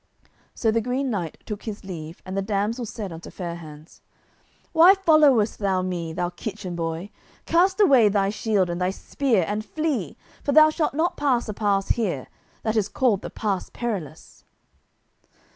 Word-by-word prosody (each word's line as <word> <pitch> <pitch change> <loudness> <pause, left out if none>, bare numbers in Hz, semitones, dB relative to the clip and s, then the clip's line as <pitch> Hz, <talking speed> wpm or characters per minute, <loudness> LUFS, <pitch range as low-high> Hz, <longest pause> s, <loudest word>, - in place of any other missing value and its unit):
So 225 - +1
the 230 +1 +1
Green 250 +3 -1
Knight 175 -7 -3
took 210 -2 -5
his 215 -2 -6
leave, 165 -3 -8
and 185 0 -5
the 195 - 0
damsel 210 +4 -1
said 205 -3 -6
unto 165 +2 -9
Fair 175 -3 -5
hands, 155 -1 -13 0.7
"Why 345 +4 +8
followest 300 - +4
thou 190 -3 +1
me, 175 -3 -3
thou 175 +1 -2
kitchen 190 -1 -6
boy; 165 +3 -4 0.3
cast 370 +4 +3
away 265 - +6
thy 200 -1 +1
shield 210 -3 +1
and 175 +1 -4
thy 180 - +2
spear 220 0 0
and 210 +1 -2
flee, 280 - -2 0.3
for 285 - 0
thou 310 +1 +7
shalt 305 -3 -1
not 345 +3 0
pass 260 -5 +1
a - - -2
pass 200 -2 0
here, 185 - 0 0.4
that 220 0 0
is 210 -2 +1
called 235 -7 +1
the - - -6
pass 200 -4 -2
Perilous." 185 - -6
210 Hz, 170 wpm, -24 LUFS, 185-255 Hz, 0.7 s, Why